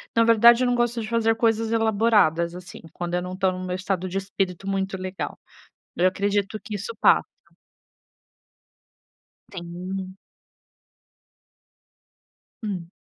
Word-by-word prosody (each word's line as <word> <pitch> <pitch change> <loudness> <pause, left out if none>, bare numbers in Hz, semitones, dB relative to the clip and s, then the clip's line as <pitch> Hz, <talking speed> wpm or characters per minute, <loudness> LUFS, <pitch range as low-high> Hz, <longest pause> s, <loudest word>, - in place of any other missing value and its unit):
na 230 - +5
verdade, 235 +2 +6
eu - - +2
não 245 - +2
gosto 240 -1 0
de 215 - -5
fazer 225 -1 +2
coisas 225 -1 +1
elaboradas, 210 -7 +2
assim, 180 0 -10
quando 175 0 -5
eu 180 - 0
não 180 +1 -6
estou 190 0 +1
no 185 0 -6
meu 180 - -2
estado 185 -1 -2
de 185 +1 -3
espírito 195 -1 -3
muito 195 -1 -1
legal, 185 0 -5 0.6
eu 180 - +3
acredito 200 +2 0
que 215 - -7
isso 205 +4 -6
passa. - - +5 2.3
Sim. 185 +1 -6 2.5
Hum. 185 -5 -4
195 Hz, 130 wpm, -24 LUFS, 185-225 Hz, 2.5 s, verdade